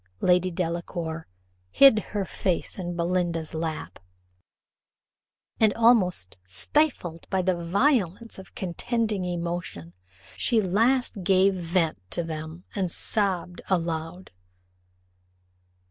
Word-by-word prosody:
Lady 180 0 +3
Delacour 170 -1 -3 0.4
hid 270 - +7
her 205 -1 -3
face 185 +1 -2
in 175 -1 -4
Belinda's 170 -2 -1
lap, 160 -1 -4 1.6
and 220 -2 +5
almost 190 - +3
stifled 175 - 0
by 190 -1 +1
the 185 0 +2
violence 200 - +1
of 190 - -13
contending 210 +3 -2
emotions, 170 - -4 0.4
she 235 - +1
at 210 - 0
last 225 +2 +1
gave 190 +1 +4
vent 170 - 0
to 170 - -1
them, 160 +1 -6
and 190 -3 -1
sobbed 180 -2 -2
aloud. 165 0 -2
180 Hz, 100 wpm, -26 LUFS, 165-200 Hz, 1.6 s, hid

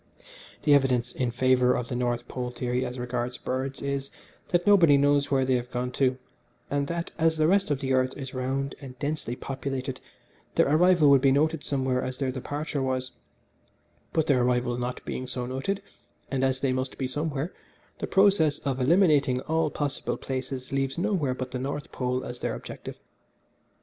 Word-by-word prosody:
The 150 - +5
evidence 125 -3 +3
in 125 -2 -1
favour 125 +1 +3
of 120 -1 -2
the 125 - -4
North 120 -1 -1
Pole 125 -1 -4
theory 125 +1 -2
as 125 +1 -4
regards 125 0 -3
birds 130 +2 -3
is, 140 0 -2 0.4
that 175 0 +1
nobody 170 -8 +6
knows 145 0 +3
where 135 -2 +2
they 130 - +2
have 120 0 -5
gone 125 0 -2
to, 130 0 +1 0.5
and 140 0 0
that 170 +2 -3
as 160 0 +3
the 155 - +3
rest 195 0 +3
of 145 -2 0
the 135 -1 0
earth 130 0 +1
is 135 -2 -6
round 135 +2 -2
and 130 -2 -9
densely 145 -3 -3
populated 135 0 -4 0.6
their - - +4
arrival 160 0 +5
would 135 -2 +6
be 135 -1 +5
noted 155 +2 +2
somewhere 130 -2 0
as 130 0 -4
their 135 -2 -1
departure 145 +3 -3
was, 130 -1 -1 1.0
but 160 - +1
their 140 -5 +3
arrival 125 0 +1
not 125 +1 -4
being 130 - -4
so 125 -1 -3
noted, 135 +11 -3 0.5
and 135 -1 0
as 130 0 +1
they 135 -2 +1
must 130 0 -3
be 130 - -1
somewhere, 145 +4 -2 0.5
the - - -3
process 190 -7 +4
of 135 -2 -2
eliminating 150 -4 +4
all 160 +2 0
possible 145 -1 -2
places 130 -1 -5
leaves 135 +1 -1
nowhere 175 -9 0
but 130 0 -5
the 125 - -3
North 140 +3 -4
Pole 125 0 -1
as 120 0 -6
their - - -2
objective. - - -8
135 Hz, 185 wpm, -27 LUFS, 125-145 Hz, 1.0 s, nobody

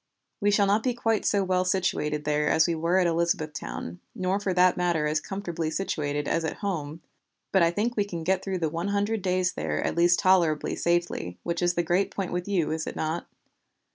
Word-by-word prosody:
We 205 -2 +2
shall 205 0 +4
not 205 +2 +2
be 250 0 -1
quite 225 -3 0
so 200 -1 +2
well 185 -1 +1
situated 175 -5 0
there 150 0 +1
as 160 - +4
we 170 - +1
were 165 +3 +1
at 185 - +3
Elizabethtown, 155 - -2 0.2
nor 185 +1 0
for 200 -2 -1
that 180 0 +4
matter 175 -4 +1
as 150 +1 +1
comfortably 175 -5 -4
situated 145 -5 -2
as 165 - 0
at 160 - -2
home, 160 -4 -3 0.5
but 190 - +4
I 170 - +5
think 215 +7 -1
we 205 - +2
can 170 -5 -5
get 190 +2 +1
through 190 -1 -2
the 165 -3 -1
one 170 +4 -3
hundred 205 +2 0
days 185 -1 +1
there 75 -1 -2
at - - -1
least 175 +1 +4
tolerably 170 -5 +2
safely, 170 - -1
which 170 0 -2
is 175 0 +2
the 175 - +1
great 175 +4 +1
point 195 -3 -4
with 180 +1 -3
you, 175 -7 0
is 160 0 -3
it - - -5
not? 160 +2 -3
175 Hz, 215 wpm, -27 LUFS, 160-190 Hz, 0.5 s, I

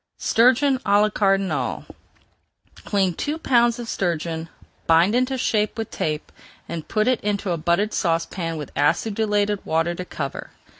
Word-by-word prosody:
STURGEON 260 +3 +3
À 205 -2 +3
LA 210 +1 +3
CARDINAL 195 - 0 1.0
Clean 195 -3 +1
two 295 - -3
pounds 240 -5 +3
of 240 -1 -6
sturgeon, 165 -4 -2 0.4
bind 165 +5 +4
into 255 +2 +1
shape 215 -3 0
with 225 -1 -4
tape, 155 -1 -3 0.4
and 165 -2 -6
put 215 +1 0
it 255 -2 +2
into 200 -2 -1
a 170 - 0
buttered 175 +7 0
saucepan 165 0 -1
with 150 - -7
acidulated 205 +6 +1
water 165 +2 0
to 180 - -5
cover. 140 -6 -6
200 Hz, 145 wpm, -23 LUFS, 165-225 Hz, 1.0 s, bind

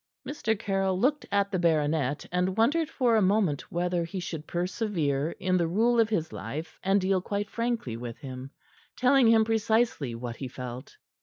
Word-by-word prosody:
Mr. 225 -7 -1
Caryll 195 -2 0
looked 290 +6 +1
at 200 0 +1
the 185 - 0
baronet, 150 -4 +1
and 180 +2 0
wondered 295 +8 +2
for 245 -7 +2
a 220 - +4
moment 190 -7 +1
whether 175 0 0
he 170 +3 -5
should 160 -3 -6
persevere 175 -6 -1
in 185 0 +1
the 170 -2 +1
rule 230 +7 +2
of 225 -1 +4
his 165 -7 -1
life 140 - -6
and 195 +1 +3
deal 190 0 +1
quite 205 +2 -3
frankly 230 - -2
with 115 0 -6
him, 130 -1 -8 0.5
telling 255 -1 +4
him 225 -1 +5
precisely 220 - +1
what 120 0 -6
he 135 - -5
felt. 125 0 -8
185 Hz, 175 wpm, -28 LUFS, 150-220 Hz, 0.5 s, him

